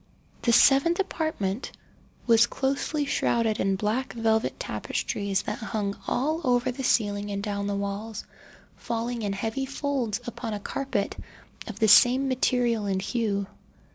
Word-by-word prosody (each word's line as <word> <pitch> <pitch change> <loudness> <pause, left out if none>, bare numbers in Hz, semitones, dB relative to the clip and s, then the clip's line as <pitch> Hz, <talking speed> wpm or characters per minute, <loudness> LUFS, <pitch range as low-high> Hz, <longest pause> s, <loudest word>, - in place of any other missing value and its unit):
The 235 - +2
seventh 275 +8 +5
apartment 315 - -2 0.5
was 230 0 +5
closely 280 +2 -1
shrouded 230 -5 +1
in 195 0 +1
black 215 +7 -1
velvet 225 -1 0
tapestries 200 -2 -2
that - - -4
hung 205 -2 -2
all 310 +6 0
over 250 -1 +2
the 265 +2 -6
ceiling 205 -4 +1
and 200 0 -3
down 200 -1 -2
the 200 - -1
walls, 200 +2 -4 0.5
falling 235 0 -3
in 205 -2 -1
heavy 225 +7 -3
folds 270 -6 -2
upon 230 -2 -4
a - - -4
carpet 250 -1 -2 0.5
of - - -7
the 220 - +3
same 255 +5 +6
material 245 -4 +1
and 190 -1 0
hue. 200 -1 -1
230 Hz, 140 wpm, -26 LUFS, 205-260 Hz, 0.5 s, same